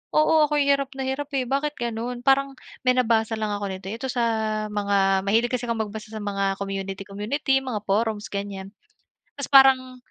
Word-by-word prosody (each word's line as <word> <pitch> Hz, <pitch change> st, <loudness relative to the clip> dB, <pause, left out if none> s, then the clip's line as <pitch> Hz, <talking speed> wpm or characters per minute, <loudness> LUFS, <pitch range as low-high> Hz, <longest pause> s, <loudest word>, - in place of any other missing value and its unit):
Oo, 310 Hz, 0 st, +5 dB
ako 300 Hz, -, -1 dB
yung 280 Hz, -, +2 dB
hirap 275 Hz, -1 st, +1 dB
na 265 Hz, -, -3 dB
hirap 285 Hz, +2 st, -3 dB
eh 255 Hz, -2 st, 0 dB
bakit 285 Hz, +2 st, 0 dB
gano'n. 240 Hz, +1 st, -3 dB
Parang 275 Hz, 0 st, +3 dB, 0.4 s
may -, -, +7 dB
nabasa 225 Hz, -2 st, +2 dB
lang 215 Hz, -, -1 dB
ako 205 Hz, 0 st, -3 dB
nito 190 Hz, 0 st, -7 dB
ito 230 Hz, +5 st, -4 dB
sa 245 Hz, -2 st, 0 dB, 0.5 s
mga 200 Hz, -2 st, +2 dB
mahilig 225 Hz, +4 st, +3 dB
kasi 250 Hz, -1 st, -1 dB
kong 230 Hz, -1 st, -1 dB
magbasa 215 Hz, +1 st, -9 dB
sa 220 Hz, -, -5 dB
mga 195 Hz, -1 st, -1 dB
community-community, 200 Hz, +8 st, -2 dB
mga 240 Hz, -5 st, -3 dB
forums 210 Hz, +1 st, 0 dB
ganyan. 200 Hz, 0 st, -5 dB, 0.6 s
Tas 280 Hz, -, -5 dB
parang 260 Hz, -2 st, +6 dB
225 Hz, 180 wpm, -24 LUFS, 200-270 Hz, 0.6 s, may